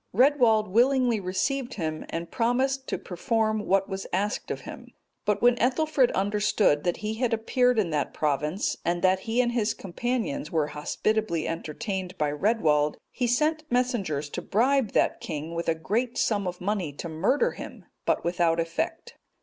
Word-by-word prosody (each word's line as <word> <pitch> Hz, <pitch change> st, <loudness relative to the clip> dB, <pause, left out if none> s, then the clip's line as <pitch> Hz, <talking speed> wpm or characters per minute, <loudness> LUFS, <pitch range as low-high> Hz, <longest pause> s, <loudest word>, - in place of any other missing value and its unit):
Redwald 240 Hz, -4 st, +4 dB
willingly 245 Hz, +2 st, +3 dB
received 245 Hz, +8 st, -2 dB
him, 155 Hz, -4 st, -4 dB
and 165 Hz, 0 st, -5 dB
promised 260 Hz, +3 st, 0 dB
to -, -, -2 dB
perform 215 Hz, +3 st, -1 dB
what 195 Hz, 0 st, +2 dB
was 195 Hz, -1 st, -5 dB
asked 205 Hz, +4 st, -1 dB
of -, -, -3 dB
him. -, -, -9 dB, 0.4 s
But 210 Hz, +1 st, 0 dB
when 245 Hz, 0 st, +5 dB
Ethelfrid 265 Hz, +1 st, +2 dB
understood 205 Hz, -5 st, +2 dB
that 175 Hz, -, +1 dB
he 215 Hz, -, -1 dB
had 230 Hz, +1 st, 0 dB
appeared 250 Hz, +2 st, +2 dB
in 190 Hz, -6 st, +1 dB
that 150 Hz, -2 st, -1 dB
province, 150 Hz, +5 st, -1 dB
and 175 Hz, +1 st, -1 dB
that 185 Hz, 0 st, +4 dB
he 235 Hz, +3 st, +3 dB
and 240 Hz, -1 st, 0 dB
his 230 Hz, -3 st, 0 dB
companions 250 Hz, +8 st, -3 dB
were 160 Hz, -3 st, +2 dB
hospitably 170 Hz, +3 st, -1 dB
entertained 185 Hz, +3 st, -4 dB
by 150 Hz, -1 st, 0 dB
Redwald, 150 Hz, -4 st, +2 dB
he 245 Hz, -, -1 dB
sent 305 Hz, +6 st, +1 dB
messengers 225 Hz, -, 0 dB
to -, -, -4 dB
bribe 250 Hz, +2 st, +1 dB
that -, -, +2 dB
king 155 Hz, +2 st, -5 dB
with 170 Hz, 0 st, -2 dB
a 165 Hz, -, +2 dB
great 230 Hz, +9 st, -1 dB
sum 205 Hz, -4 st, +1 dB
of 180 Hz, 0 st, -4 dB
money 190 Hz, -4 st, -1 dB
to 155 Hz, -, -6 dB
murder 205 Hz, -, +1 dB
him, -, -, -9 dB, 0.2 s
but -, -, +1 dB
without 170 Hz, -1 st, +2 dB
effect. 165 Hz, 0 st, -3 dB
210 Hz, 165 wpm, -27 LUFS, 170-245 Hz, 0.4 s, when